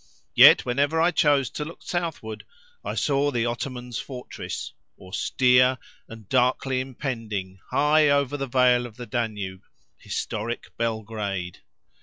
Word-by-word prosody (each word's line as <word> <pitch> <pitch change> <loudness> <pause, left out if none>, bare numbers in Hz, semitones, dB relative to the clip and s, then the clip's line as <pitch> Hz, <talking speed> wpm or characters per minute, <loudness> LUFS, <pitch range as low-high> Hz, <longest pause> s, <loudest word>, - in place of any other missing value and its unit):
Yet, - - +8
whenever 140 +6 +1
I 170 +2 +4
chose 145 -5 +2
to 150 - -4
look 165 +3 -10
southward, 165 -11 -4 0.4
I - - -4
saw 140 0 +1
the 120 -4 0
Ottoman's 125 0 -4
fortress—austere, 125 0 -1 0.3
and 115 -3 -12
darkly 130 +2 +1
impending 115 -8 -5
high 150 +1 +4
over 140 -1 +2
the 135 -1 -3
vale 125 -1 +3
of 110 - -16
the 125 - -7
Danube—historic 110 0 -5
Belgrade. 105 -5 -3
125 Hz, 115 wpm, -25 LUFS, 110-140 Hz, 0.4 s, Yet